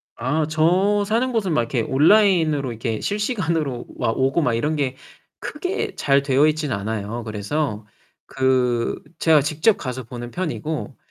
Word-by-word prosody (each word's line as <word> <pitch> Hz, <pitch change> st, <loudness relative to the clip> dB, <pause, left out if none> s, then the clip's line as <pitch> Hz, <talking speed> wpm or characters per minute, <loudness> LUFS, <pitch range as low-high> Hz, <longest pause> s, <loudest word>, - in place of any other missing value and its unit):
아 150 Hz, +6 st, 0 dB
저 185 Hz, +6 st, +2 dB
사는 235 Hz, +5 st, 0 dB
곳은 200 Hz, -8 st, 0 dB
막 120 Hz, -, +3 dB
이렇게 115 Hz, 0 st, -1 dB
온라인으로 155 Hz, -, +3 dB
이렇게 115 Hz, -1 st, -3 dB
실시간으로 170 Hz, -, -1 dB
막 115 Hz, -, -1 dB
오고 135 Hz, +5 st, +2 dB
막 125 Hz, -5 st, +1 dB
이런 150 Hz, +7 st, 0 dB
게 135 Hz, -3 st, -1 dB, 0.4 s
크게 365 Hz, +6 st, -4 dB
잘 140 Hz, 0 st, +2 dB
되어있지는 150 Hz, 0 st, +2 dB
않아요. 110 Hz, +3 st, -4 dB
그래서 110 Hz, +1 st, -3 dB, 0.4 s
그 125 Hz, -3 st, 0 dB, 0.2 s
제가 155 Hz, -3 st, +5 dB
직접 155 Hz, +9 st, +2 dB
가서 130 Hz, -1 st, -5 dB
보는 120 Hz, +1 st, -8 dB
편이고 155 Hz, -5 st, -4 dB
145 Hz, 300 characters per minute, -22 LUFS, 120-165 Hz, 0.4 s, 제가